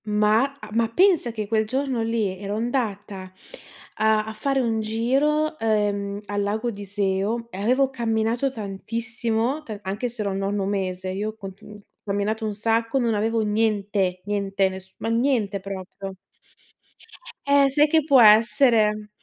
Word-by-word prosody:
Ma 210 +1 +3 0.2
ah - - -10
ma 230 0 +2
pensa 350 - +3
che 215 -2 -4
quel 220 0 +1
giorno 260 0 -1
lì 225 -4 -1
ero 200 +1 -4
andata 210 -5 -2 0.7
a 215 0 +2
a 220 - -6
fare 270 +5 0
un 230 -3 0
giro 275 +8 0
ehm 205 -2 0
al 205 0 -2
Lago 215 +4 -1
di 205 -2 -9
Iseo 200 +3 -1
e 190 - -7
avevo 260 +5 +2
camminato 230 +1 0
tantissimo, 230 +4 -3
ta 220 -8 -7
anche 205 +6 -3
se 235 -1 -7
ero 200 - -1
al 190 - -3
nono 195 0 -1
mese, 190 -2 -2
io 210 +3 -3
ho 195 -2 -7 0.5
camminato 210 +2 -2
un 210 - -3
sacco, 225 +3 0
non 235 -3 +1
avevo 225 +2 0
niente, 205 -3 0
niente, 200 -1 0
ness 190 0 -10
ma 225 - -3
niente 230 -4 +1
proprio. 195 0 -7 1.3
Eh, 280 -1 +4
sai 295 +2 +4
che 315 +1 +3
può 275 -4 +5
essere? 215 -1 +4
220 Hz, 155 wpm, -24 LUFS, 200-235 Hz, 1.3 s, può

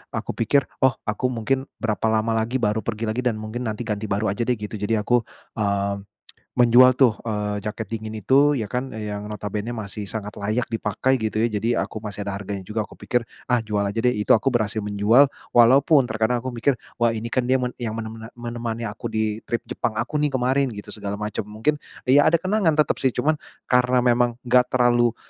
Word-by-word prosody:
aku - - -3
pikir, 135 +5 +2 0.2
"Oh 130 -2 +4
aku 105 +4 -1
mungkin 130 +2 -1
berapa 110 0 0
lama 110 +1 +1
lagi 115 +3 -2
baru 110 -3 +1
pergi 115 -1 -3
lagi 110 +3 -2
dan 120 -3 +2
mungkin 110 +3 -5
nanti 110 +2 -3
ganti 110 -1 -3
baru 100 0 0
aja 115 +4 -2
deh," 125 - +2
gitu. 105 -1 -6
Jadi 105 +2 0
aku, 115 +2 +1 0.3
eee, 100 -1 0 0.6
menjual 125 +1 +7
tuh, 125 -5 +5
eee, 105 -2 -2
jaket 105 +1 -4
dingin 110 0 -5
itu 140 +4 +4
ya 110 - -2
kan 125 +5 -3
yang 105 -1 -5
notabennya 105 +1 -4
masih 105 -3 -5
sangat 105 -2 -5
layak 110 +4 -1
dipakai 115 +4 0
gitu 110 -3 -2
ya. 115 - +3
Jadi 115 +3 0
aku 110 - -4
masih 105 -1 -5
ada 100 - -3
harganya 100 0 -5
juga. 110 +2 -2
Aku - - -12
pikir, 120 +4 0 0.2
"Ah 125 -2 +2
jual 105 -2 -1
aja 100 +2 -4
deh," 125 - +4
itu 105 -3 +3
aku 115 +5 +2
berhasil 110 -3 0
menjual 105 +7 +4 0.2
walaupun 135 +5 +6
terkadang 115 +2 0
aku 130 - -3
mikir, 125 +3 +1 0.2
"Wah 120 -1 +2
ini 115 +1 -4
kan 125 0 0
dia 130 - +3
men 125 -1 -1
yang 115 -3 -3
mene 110 -1 -4
mene 110 0 -9
menemani 120 -1 -5
aku 110 +2 -5
di 110 -1 -1
trip 120 - -2
Jepang 110 - -3
aku 150 +7 -2
nih 150 0 +2
kemarin," 130 +2 +2
gitu 105 - -9
segala 100 0 -5
macem. 105 0 -4
Mungkin 110 +9 -1 0.3
ya 145 +2 +6
ada 160 - +4
kenangan 185 -1 +1
tetep 150 -2 +2
sih. 130 -2 +1
Cuman 155 0 +1 0.3
karena 125 0 +4
memang 120 -1 +3
enggak 125 0 +3
terlalu 120 -2 +3
115 Hz, 210 wpm, -23 LUFS, 105-125 Hz, 0.6 s, menjual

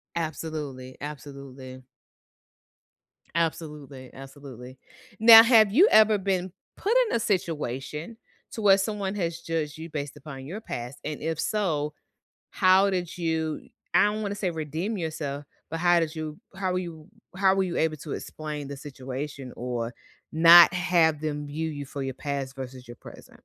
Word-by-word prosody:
Absolutely. 155 -5 -5
Absolutely. 135 -3 -9 1.5
Absolutely, 150 -5 -3
absolutely. 135 -2 -11 0.4
Now, 225 0 +11
have 220 -4 +5
you 355 - +6
ever 215 -1 +6
been 185 -2 -1 0.3
put 425 +4 0 0.2
in - - 0
a - - +2
situation 160 - -3 0.3
to 220 - -6
where 195 -1 +6
someone 200 0 -2
has 170 -3 -2
judged 160 -2 -3
you 165 +1 -8
based 145 -1 -5
upon 135 -2 -9
your 200 +9 -7
past 125 - -6
and 150 -1 -5
if 160 0 -3
so, 155 -8 -1 0.6
how 185 +2 +4
did 180 -2 -3
you 160 -2 -2 0.3
I - - +5
don't 210 +1 0
wanna 205 -1 -3
say 195 -3 -2
redeem 160 +6 -3
yourself, 150 -4 -4 0.3
but 165 0 -4
how 175 -1 +4
did 160 0 -2
you 155 -1 -6 0.2
how 190 -1 -1
were 180 - 0
you 165 -4 -8 0.3
how 190 0 +4
were 195 - +2
you 175 -2 -4
able 160 -1 +1
to 150 - -7
explain 150 -2 -6
the 140 - -6
situation 135 -1 -7
or 120 -1 -3 0.4
not 170 +3 +9
have 175 -4 +2
them 150 -1 -3
view 160 +2 -3
you 145 -1 -6
for 140 +1 -6
your 135 -1 -4
past 140 -1 -4
versus 130 -1 -8
your 120 - -10
present? - - -14
155 Hz, 160 wpm, -26 LUFS, 140-180 Hz, 1.5 s, Now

